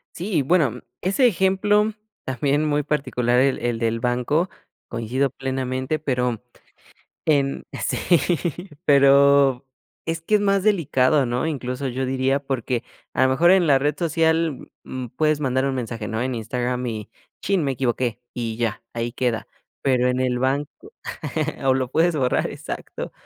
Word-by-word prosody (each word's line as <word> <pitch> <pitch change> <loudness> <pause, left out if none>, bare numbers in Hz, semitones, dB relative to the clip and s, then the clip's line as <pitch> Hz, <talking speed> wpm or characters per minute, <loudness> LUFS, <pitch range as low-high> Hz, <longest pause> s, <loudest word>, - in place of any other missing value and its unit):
Sí, 195 +5 -4
y - - +4
bueno 135 -5 +2 0.2
ese 200 +8 +3
ejemplo 210 +2 +2 0.3
también 140 +3 0
muy 150 -1 +1
particular 125 -4 +1
el 135 0 +2
el 120 -1 -1
del 115 0 0
banco, 125 +9 0 0.4
coincido 120 +4 -1
plenamente, 130 +2 -2
pero, 125 -6 -1 0.9
em, 140 -3 +1 0.2
sí, - - -1 0.9
pero 140 -1 +5 0.4
es 165 0 -2
que 210 +6 +3
es - - 0
más 200 -1 +2
delicado, 150 -8 +3
¿no?, 120 +5 -1
incluso 135 -3 -3
yo 130 +1 -2
diría, 130 +1 +1
porque 130 -3 -2 0.3
a 130 - +3
lo 130 - +3
mejor 165 +7 +4
en 185 -2 +5
la 140 -3 +5
red 145 +2 0
social, 160 -3 0
mm, 130 -1 -5
puedes 155 -1 +2
mandar 130 -2 +1
un 135 - -1
mensaje, 115 -3 -4
¿no?, 110 +2 -2
en 130 0 -2
Instagram, 125 +2 -2
y 110 -2 -5 0.3
chin, 195 -3 +1
me 135 - 0
equivoqué 125 -2 -1
y 115 -2 -3
ya, 115 -1 -2
ahí 120 0 -2
queda, 120 -3 -1 0.4
pero 125 -2 +2
en 125 0 0
el 125 -1 0
banco, 140 +3 0 1.0
o 135 - +5
lo 130 -1 -1
puedes 170 +1 +3
borrar, 130 -4 +1
exacto, - - -6
135 Hz, 155 wpm, -23 LUFS, 125-155 Hz, 1.0 s, pero